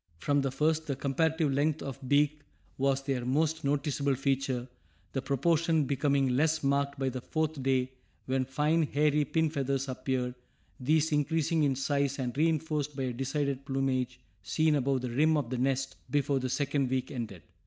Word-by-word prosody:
From 145 - +1
the 135 - 0
first, 155 +4 0
the 140 - -1
comparative 155 +2 +1
length 150 +2 +1
of 135 -3 -6
beak 145 +1 +3 0.4
was 135 0 +1
their 135 -3 -1
most 155 +5 0
noticeable 140 -1 0
feature, 135 -2 -1 0.5
the 135 - -1
proportion 160 +3 +2
becoming 140 0 +1
less 155 +5 +1
marked 140 0 +1
by 135 -1 0
the 130 0 -5
fourth 155 0 -2
day 130 -1 +1 0.3
when 130 0 0
fine 150 +5 +1
hairy 150 0 +2
pin 160 +2 +1
feathers 135 -2 -1
appeared, 130 -1 -2 0.5
these 155 +4 +2
increasing 155 +2 +1
in 140 -3 +2
size 140 0 0
and 125 -2 -3
reinforced 155 -1 0
by 135 - -2
a 125 -1 -2
decided 135 +1 -2
plumage 130 -2 -1 0.2
seen 150 - +2
above 135 -2 +1
the 125 -1 -3
rim 155 +5 +3
of 130 -5 -2
the 130 - -1
nest 135 +1 0
before 145 -1 +1
the 130 0 -2
second 140 0 0
week 130 0 -1
ended. 110 - -6
140 Hz, 170 wpm, -30 LUFS, 130-150 Hz, 0.5 s, beak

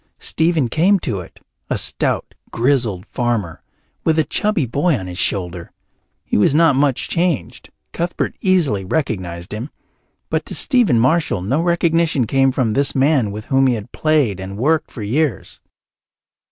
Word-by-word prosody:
Stephen 160 -5 +1
came 175 - +3
to 115 - -3
it, 90 - -12 0.3
a - - 0
stout - - -1 0.2
grizzled 115 -7 0
farmer, 115 -9 -2 0.4
with 160 -1 +2
a 160 - +4
chubby 210 -3 0
boy 145 +6 +1
on 95 - -6
his 90 0 -6
shoulder. 90 -3 -2 0.5
He - - 0
was 105 +7 +3
not 160 -3 +4
much 135 -2 +1
changed; 170 -4 -2 0.2
Cuthbert 170 +1 -2
easily 165 - +2
recognized 90 - -3
him, 115 +7 -5 0.6
but - - 0
to - - -4
Stephen 235 - +3
Marshall 130 - +1
no 135 - 0
recognition 170 -5 +1
came 135 +3 +2
of 120 -5 +1
this 140 +3 +1
man 135 -4 +2
with 105 +2 -7
whom 135 0 +3
he 125 - +2
had 110 +2 -8
played 145 - +1
and 95 +1 -7
worked 155 +7 +1
for 115 - -8
years. 130 - -2
135 Hz, 155 wpm, -19 LUFS, 105-160 Hz, 0.6 s, a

